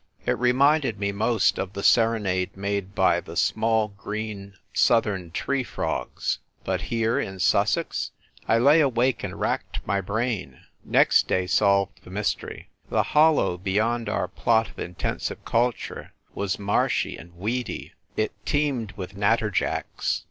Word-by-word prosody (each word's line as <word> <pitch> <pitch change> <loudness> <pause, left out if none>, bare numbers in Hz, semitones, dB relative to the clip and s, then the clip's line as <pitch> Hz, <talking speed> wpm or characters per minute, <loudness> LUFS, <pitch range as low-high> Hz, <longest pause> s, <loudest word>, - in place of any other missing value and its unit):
It - - +2
reminded 130 0 +3
me 100 0 0
most 105 0 +1
of 95 0 -3
the 100 - -5
serenade 100 -5 +2
made 100 -1 -3
by - - +3
the - - -10
small 110 -1 +2
green 100 -1 -6 0.2
southern 105 -7 +2
tree 135 +10 -1
frogs; - - -3 0.2
but 95 -1 -1
here, 115 0 +1
in 95 0 -4
Sussex! 90 - +1 0.4
I 115 - +4
lay 145 +7 +6
awake 130 -2 +1
and - - -5
racked - - -2
my 100 0 0
brain. 100 - -3 0.2
Next - - +4
day 90 0 +1
solved 100 +1 +2
the - - -13
m3'stery. 100 +2 -3 0.2
The - - +2
hollow 150 - +4
beyond 110 +4 0
our 100 - -1
plot 110 +4 +1
of - - -14
intensive 90 0 -4
culture 120 +1 -1 0.2
was 100 -1 -2
marshy 100 0 0
and 85 +2 -13
weedy, 110 +6 -3 0.2
it 110 0 +1
teemed 135 -8 0
with 95 0 -7
natterjacks. 105 0 0
105 Hz, 140 wpm, -25 LUFS, 95-115 Hz, 0.4 s, lay